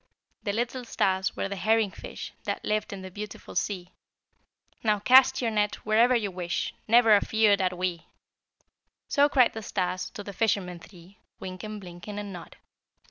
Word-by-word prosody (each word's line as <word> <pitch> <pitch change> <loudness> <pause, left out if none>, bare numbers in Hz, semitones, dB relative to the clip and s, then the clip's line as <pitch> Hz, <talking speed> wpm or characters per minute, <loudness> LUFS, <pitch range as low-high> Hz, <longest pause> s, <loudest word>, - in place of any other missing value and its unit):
The 205 - -2
little 240 +4 -2
stars 190 -4 0
were - - -2
the 200 - -4
herring 220 0 +2
fish - - -8
That - - -3
lived 215 0 -1
in 195 -2 -7
the 185 - -8
beautiful 210 +2 -8
sea, 180 0 -2 0.9
"Now 215 -2 +3
cast 255 +5 +6
your 230 - +1
net 210 -1 +1
wherever 230 +4 +4
you 210 -4 0
wish, 175 -1 -3
Never 230 0 +6
afeared 210 -1 +4
are 185 -1 0
we." 180 -2 -3 1.0
So 290 0 +3
cried 255 -4 +4
the 220 - -6
stars 185 -3 -2
to 205 - -6
the 200 - -8
fishermen 185 -5 0
three, 180 +3 -16 0.2
Wynken, 190 +3 -7
Blynken, 180 +2 -9
And 205 -1 -5
Nod. 175 -2 -10
205 Hz, 165 wpm, -27 LUFS, 185-220 Hz, 1.0 s, cast